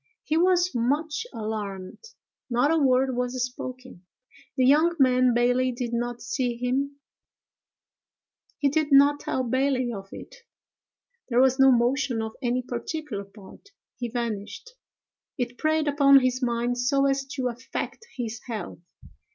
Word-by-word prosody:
He 310 - -1
was 360 +1 +3
much 295 - -1
alarmed: 205 - -6 0.5
not 245 +5 +2
a 325 - +3
word 260 -2 +2
was 250 +1 -2
spoken. 255 -5 -9 0.5
The 255 - +3
young 310 +6 +4
man 255 -3 +4
Bailey 250 +1 +2
did 240 -1 -4
not 240 0 -3
see 245 -1 -2
him; 265 +3 -1 1.6
he 285 - +1
did 305 +1 0
not 285 +1 +6
tell 260 - -2
Bailey 255 0 0
of 195 -2 -8
it. - - -11 0.9
There 240 0 +2
was 265 +1 +4
no 270 0 +7
motion 250 +1 +1
of 220 0 -4
any 250 0 0
particular 245 -3 -5
part: 200 - -16 0.3
he 240 -1 -4
vanished. 235 - -5 0.7
It 245 -1 -4
preyed 310 0 +1
upon 280 -1 +6
his 255 0 0
mind 240 0 -1
so 275 +3 +2
as 275 0 +1
to 255 -2 -1
affect 255 - -6
his 235 -2 -4
health. 215 -7 -6
255 Hz, 140 wpm, -25 LUFS, 240-280 Hz, 1.6 s, no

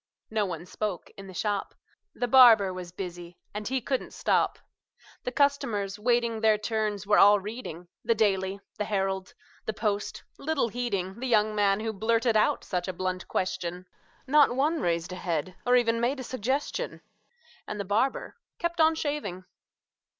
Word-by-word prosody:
No 215 -2 +1
one 170 -1 -5
spoke 195 -1 -4
in 195 0 -10
the 190 - -10
shop: 205 0 -2 0.4
The 245 - -1
barber 230 -7 +7
was 180 -1 -7
busy, 175 -1 -7 0.2
and 210 0 -4
he 265 +1 0
couldn't 260 +2 -2
stop; - - +1 0.7
The 250 - -1
customers, 225 -8 0
waiting 235 0 +1
their 220 -1 +4
turns, 215 -2 -2
were 205 +1 +4
all 205 +1 +7
reading 195 -5 -7 0.2
The 230 - +2
"Daily," 195 -2 +1 0.2
the 210 - 0
"Herald," 195 -2 -2 0.3
the 220 - 0
"Post," 210 -1 -2 0.2
little 290 -5 0
heeding 205 -4 -3
The 260 - -3
young 215 -3 +3
man 205 -1 +2
who 220 0 -2
blurted 225 +2 +1
out 215 - +3
such 180 -1 -2
a 185 - -2
blunt 185 +1 -3
question; 180 -1 -2 0.4
Not 285 -2 +5
one 300 +5 +1
raised 170 0 -1
a 185 - -5
head, 180 0 -2
or 250 - +5
even 230 -2 +2
made 260 +4 0
a - - -4
suggestion; 260 - -2 0.7
And 210 - -5
the 200 - -2
barber 220 +7 0 0.2
kept 340 -1 -1
on 320 0 +5
shaving. 285 - -3
210 Hz, 165 wpm, -28 LUFS, 190-245 Hz, 0.7 s, barber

